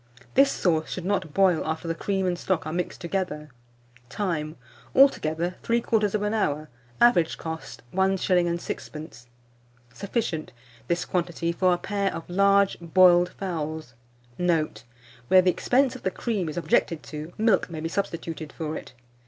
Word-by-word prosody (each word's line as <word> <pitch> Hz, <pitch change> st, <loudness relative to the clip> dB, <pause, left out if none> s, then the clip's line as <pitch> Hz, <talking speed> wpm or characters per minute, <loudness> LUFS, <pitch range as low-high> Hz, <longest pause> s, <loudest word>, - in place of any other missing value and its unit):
This 275 Hz, +1 st, +5 dB
sauce 160 Hz, -3 st, 0 dB
should 185 Hz, -, -5 dB
not 185 Hz, -5 st, -1 dB
boil 185 Hz, -1 st, +3 dB
after 160 Hz, +2 st, -3 dB
the 165 Hz, -, 0 dB
cream 190 Hz, +2 st, -1 dB
and 180 Hz, -1 st, +1 dB
stock 175 Hz, 0 st, -1 dB
are 155 Hz, -, -4 dB
mixed 180 Hz, +1 st, -3 dB
together. 170 Hz, -5 st, -3 dB, 0.6 s
Time. 160 Hz, -6 st, -2 dB, 0.4 s
Altogether, 175 Hz, -, +3 dB
3/4 215 Hz, -3 st, +1 dB
hour. 155 Hz, -8 st, -1 dB, 0.3 s
Average 210 Hz, -9 st, +4 dB
cost, 160 Hz, -6 st, -7 dB
1s. 190 Hz, +1 st, +2 dB
6d. 170 Hz, -, -2 dB, 0.7 s
Sufficient, 200 Hz, -, -3 dB, 0.3 s
this 170 Hz, 0 st, 0 dB
quantity, 170 Hz, -1 st, -1 dB
for 185 Hz, +2 st, +2 dB
a 175 Hz, -, +2 dB
pair 200 Hz, +1 st, -1 dB
of 165 Hz, -, -7 dB
large 200 Hz, +2 st, +3 dB
boiled 175 Hz, +1 st, +5 dB
fowls. 160 Hz, -7 st, -5 dB, 0.5 s
Note. 160 Hz, -10 st, 0 dB, 0.4 s
Where 185 Hz, +5 st, +6 dB
the 180 Hz, -, +4 dB
expense 260 Hz, +7 st, +2 dB
of 255 Hz, -, -9 dB
the -, -, 0 dB
cream 195 Hz, -3 st, -2 dB
is 155 Hz, -, -7 dB
objected 165 Hz, -1 st, +1 dB
to, 155 Hz, +2 st, -7 dB
milk 220 Hz, -5 st, +2 dB
may 165 Hz, -2 st, -6 dB
be 160 Hz, -, -3 dB
substituted 165 Hz, -4 st, -4 dB
for 155 Hz, +1 st, -4 dB
it. -, -, -8 dB
175 Hz, 145 wpm, -26 LUFS, 160-195 Hz, 0.7 s, Where